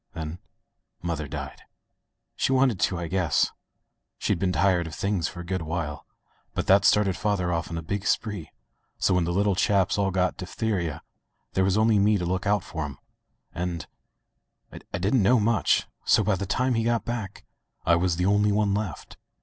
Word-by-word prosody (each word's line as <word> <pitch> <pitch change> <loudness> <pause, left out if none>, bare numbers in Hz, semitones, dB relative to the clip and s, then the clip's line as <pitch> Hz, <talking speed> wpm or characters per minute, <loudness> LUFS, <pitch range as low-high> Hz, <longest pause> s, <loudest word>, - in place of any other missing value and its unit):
Then 80 +2 -5 0.6
mother 80 -4 -2
died. 70 0 -7 0.7
She - - 0
wanted 130 -6 +3
to, 90 - +1
I 85 -1 -3
guess. 90 -1 +1 0.7
She'd - - 0
been 95 0 +1
tired 90 -3 +2
of 80 - -8
things 100 -4 0
for 90 - -7
a - - -9
good 95 0 -2
while. 80 -3 -4 0.5
But - - -1
that 100 +1 +5
started 100 -3 +4
father 95 -4 0
off 85 -1 -2
on 85 - -4
a 80 - -5
big 100 +4 -3
spree, 105 -8 -1 0.5
so 95 - +2
when 90 -2 +2
the 85 - -1
little 100 +3 +2
chaps 100 +1 +2
all 100 -1 +2
got 90 -1 0
diphtheria 90 -4 -3 0.5
there 95 - +2
was 95 +1 +2
only 110 -1 +4
me 105 +1 +4
to 90 - -2
look 95 +3 -1
out 100 -2 +2
for 80 -2 -5
*em 70 -2 -8 0.3
— - - -40
^and 85 -2 -3 0.4
— - - -18
I - - -2
didn't 100 +7 +2
know 120 +5 +4
much 110 -1 +2
— - - -47
so - - +4
by 105 - +2
the 100 +1 -4
time 130 +6 +1
he 115 -1 +1
got 115 0 0
back 110 -5 -5 0.4
I 85 - +5
was 90 0 +1
the 90 +2 0
only 105 +1 +3
one 100 -1 +2
left. 100 -7 -4
95 Hz, 200 wpm, -26 LUFS, 85-105 Hz, 0.7 s, that